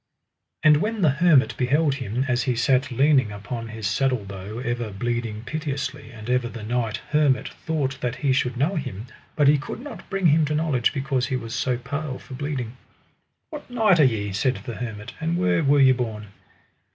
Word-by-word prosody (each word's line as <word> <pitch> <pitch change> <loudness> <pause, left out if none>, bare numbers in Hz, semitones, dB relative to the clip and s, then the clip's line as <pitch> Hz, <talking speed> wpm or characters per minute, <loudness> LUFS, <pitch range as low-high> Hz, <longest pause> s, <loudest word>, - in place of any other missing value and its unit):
And 150 -1 +7
when 215 +4 -1
the 155 - +5
hermit 160 -7 +5
beheld 140 +4 +2
him, 130 -1 -2
as 125 -1 +1
he 125 0 0
sat 130 +3 +2
leaning 130 -2 +3
upon 115 +3 -6
his 110 -1 -7
saddle 125 +2 +1
bow 100 +2 -7
ever 120 -2 -2
bleeding 115 +1 -3
piteously, 140 -6 -4
and 110 -3 -10
ever 125 -1 +1
the 115 -1 -8
knight 115 -1 -1
hermit 150 -4 +2
thought 140 -4 -3
that 125 0 -1
he 140 -1 +1
should 125 -2 0
know 155 +9 +1
him, 110 -7 -5 0.3
but 145 -2 +3
he 145 0 +5
could 145 - -6
not 285 +3 -10
bring 195 -1 -1
him 160 0 +5
to 150 +1 -1
knowledge 150 -6 +1
because 135 -3 -1
he 130 - -1
was 115 -3 -5
so 125 -2 0
pale 140 +2 -4
for - - -12
bleeding. 130 -3 -4 0.7
What 300 -3 -8
knight 220 -8 +3
are - - +7
ye, 105 -6 +1
said 125 +6 +1
the 120 - -4
hermit, 110 -4 -6
and 165 +2 0
where 90 - +2
were 145 +1 +4
ye 135 -1 +7
born? 110 -5 -3
130 Hz, 195 wpm, -24 LUFS, 115-150 Hz, 0.7 s, And